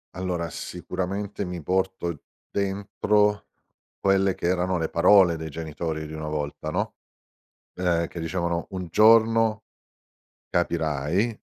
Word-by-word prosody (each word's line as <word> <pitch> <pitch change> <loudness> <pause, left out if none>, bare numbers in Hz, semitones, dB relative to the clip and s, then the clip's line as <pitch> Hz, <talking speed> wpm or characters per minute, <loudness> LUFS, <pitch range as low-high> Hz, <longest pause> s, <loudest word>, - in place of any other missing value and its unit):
Allora, 90 -2 -2
sicuramente 95 +3 -4
mi 90 -3 -5
porto 95 -3 -1 0.3
dentro, 100 +1 +1 0.5
quelle 95 -1 +3
che - - -4
erano 90 +1 +1
le 80 -2 -1
parole 90 0 +5
dei 80 0 -6
genitori 80 0 -4
di 80 - -8
una 80 0 -5
volta, 75 0 -3
no. - - -2 0.8
Ehm, 85 -2 +1
che 85 - -8
dicevano: 85 0 -2
"Un 90 -2 -4
giorno 110 +1 +5 0.9
capirai, 85 - 0
90 Hz, 115 wpm, -25 LUFS, 80-100 Hz, 0.9 s, parole